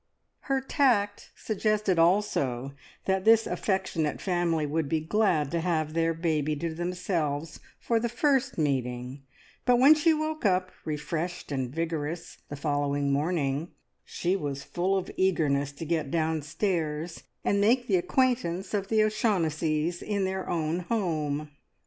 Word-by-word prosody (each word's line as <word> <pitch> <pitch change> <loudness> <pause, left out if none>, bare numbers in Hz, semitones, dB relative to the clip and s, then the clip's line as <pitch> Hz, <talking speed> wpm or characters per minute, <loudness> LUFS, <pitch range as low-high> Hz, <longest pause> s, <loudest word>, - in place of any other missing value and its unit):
Her 270 0 +3
tact 235 -7 +1
suggested 215 -4 0
also 140 -8 +1 0.3
that 190 -1 +1
this 225 +1 +6
affectionate 190 -6 -1
family 175 -4 0
would 150 0 -1
be 160 - +1
glad 160 -4 +1
to 170 - 0
have 160 -3 0
their 165 0 +1
baby 155 -3 0
to 160 +2 -3
themselves 165 -3 -2 0.2
for 230 -1 +1
the 235 +1 -1
first 270 +2 +1
meeting; 130 -3 -1 0.4
but 245 -1 +4
when 270 +5 +8
she 310 +2 +3
woke 310 0 -2
up 185 -2 +2
refreshed 160 +3 -3
and 130 -3 -1
vigorous 165 +2 -4
the 145 - -5
following 145 -1 0
morning, 150 0 -1 0.3
she 180 +2 -1
was 140 -6 -3
full 185 +6 0
of 190 - -4
eagerness 145 -7 +1
to 165 - -7
get 160 -3 -1
downstairs, 160 +1 -1 0.2
and 200 0 +2
make 240 +4 +3
the 195 -5 +3
acquaintance 205 -4 0
of 200 -2 -1
the 215 0 +3
O'Shaughnessys 170 - 0
in 200 -2 -1
their 190 0 -3
own 165 0 0
home. 155 -7 -2
170 Hz, 140 wpm, -28 LUFS, 150-200 Hz, 0.4 s, when